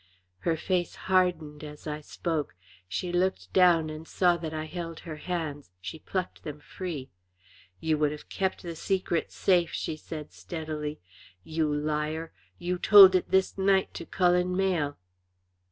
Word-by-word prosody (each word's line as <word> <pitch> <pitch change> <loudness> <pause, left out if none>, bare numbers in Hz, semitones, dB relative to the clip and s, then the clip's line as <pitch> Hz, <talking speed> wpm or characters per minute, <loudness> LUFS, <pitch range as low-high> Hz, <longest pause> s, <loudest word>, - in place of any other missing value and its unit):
Her 165 - 0
face 180 +1 -1
hardened 175 -5 +1
as 150 0 -9
I 150 0 -4
spoke. 155 - -3 0.3
She 175 - -3
looked 185 +2 0
down 170 -4 +5
and 155 +1 -8
saw 180 -2 +3
that 165 -2 -5
I 155 0 -3
held 165 0 -6
her 155 -3 -7
hands; 150 - -4
she 100 +12 -7
plucked 185 +2 -4
them 150 -1 -7
free. 150 -4 -6 0.7
"You 160 -1 +1
would 150 -1 +3
have 150 - -8
kept 190 -1 -2
the 170 -2 -5
secret 185 -1 -1
safe," 175 -3 +2
she 155 - -2
said, 155 -1 -8
steadily. 155 -2 -5 0.4
"You 155 -1 0
liar! 150 +2 -1 0.3
You 180 +1 -2
told 195 -2 +10
it 185 - +1
this 190 +1 +2
night 190 0 +3
to 170 - -7
Cullen 180 0 +2
Mayle." 175 -7 +1
165 Hz, 155 wpm, -28 LUFS, 150-180 Hz, 0.7 s, told